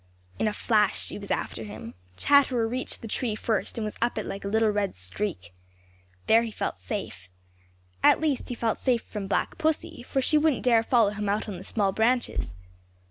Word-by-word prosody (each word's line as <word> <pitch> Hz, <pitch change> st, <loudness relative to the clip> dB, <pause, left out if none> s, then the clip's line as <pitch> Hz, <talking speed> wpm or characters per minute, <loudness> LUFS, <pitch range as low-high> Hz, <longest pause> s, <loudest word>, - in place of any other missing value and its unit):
In -, -, +2 dB
a -, -, +1 dB
flash 210 Hz, -1 st, +2 dB
she -, -, -3 dB
was 200 Hz, -, -9 dB
after 115 Hz, -, -2 dB
him. 110 Hz, +2 st, -8 dB, 0.2 s
Chatterer 265 Hz, -5 st, +4 dB
reached 255 Hz, +1 st, -4 dB
the -, -, -5 dB
tree 220 Hz, 0 st, -1 dB
first 220 Hz, +1 st, -1 dB
and 225 Hz, -, -1 dB
was 215 Hz, -, -5 dB
up 235 Hz, 0 st, +1 dB
it 215 Hz, -, -2 dB
like 195 Hz, -, -5 dB
a -, -, -3 dB
little 220 Hz, +1 st, +3 dB
red 205 Hz, -, -1 dB
streak. 90 Hz, -, -4 dB, 0.7 s
There 225 Hz, +1 st, +6 dB
he 235 Hz, -, -3 dB
felt 150 Hz, -, -4 dB
safe. 95 Hz, 0 st, -6 dB, 0.7 s
At -, -, +6 dB
least, 300 Hz, -5 st, -1 dB
he 245 Hz, -, -3 dB
felt 225 Hz, -2 st, -1 dB
safe 245 Hz, -3 st, +1 dB
from 205 Hz, -3 st, -6 dB
Black -, -, -1 dB
Pussy, 320 Hz, -1 st, -1 dB
for 265 Hz, +2 st, -2 dB
she 300 Hz, +3 st, +3 dB
wouldn't 300 Hz, -4 st, +2 dB
dare 235 Hz, -3 st, +5 dB
follow 230 Hz, -3 st, +3 dB
him 210 Hz, -1 st, -3 dB
out 205 Hz, +2 st, 0 dB
on 195 Hz, -4 st, -5 dB
the -, -, -9 dB
small 200 Hz, -3 st, 0 dB
branches. 225 Hz, -, 0 dB
220 Hz, 200 wpm, -27 LUFS, 200-245 Hz, 0.7 s, There